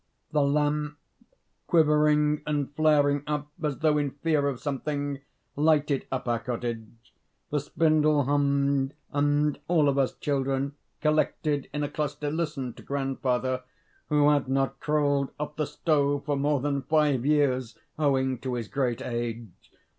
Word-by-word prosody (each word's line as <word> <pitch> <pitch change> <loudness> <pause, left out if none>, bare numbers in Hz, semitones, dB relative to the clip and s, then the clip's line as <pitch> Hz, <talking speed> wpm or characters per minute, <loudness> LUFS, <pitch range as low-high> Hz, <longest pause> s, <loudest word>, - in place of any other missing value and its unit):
The 150 - +2
lamp, 150 +1 +1 0.7
quivering 150 -2 +3
and 145 -1 -1
flaring 145 -2 +3
up 150 -1 -2
as 150 -4 -1
though 155 -1 +2
in 145 -1 0
fear 145 +1 0
of 135 -3 -2
something, 145 0 -3 0.4
lighted 150 -2 +2
up 130 -1 -3
our 120 -1 +1
cottage; 115 -1 -6 0.4
the 150 - +1
spindle 155 0 +2
hummed; 140 0 +1 0.2
and 145 +1 +1
all 160 -4 +3
of 140 0 +2
us 135 - +1
children, 135 0 -1 0.3
collected 155 -2 0
in 150 0 -2
a - - 0
cluster, 150 0 -3
listened 150 -7 -3
to - - -11
grandfather, 130 -2 -1 0.5
who 150 -1 +3
had 145 -3 +1
not 135 0 0
crawled 145 -2 +1
off 150 0 -4
the 155 -2 -1
stove 145 -3 0
for 145 - 0
more 140 0 +1
than 140 0 -1
five 145 -3 +2
years, 130 -4 +1 0.2
owing 130 -4 +1
to 130 0 -3
his 115 -3 -4
great 130 -2 -1
age. 120 -2 -4
145 Hz, 145 wpm, -27 LUFS, 135-150 Hz, 0.7 s, quivering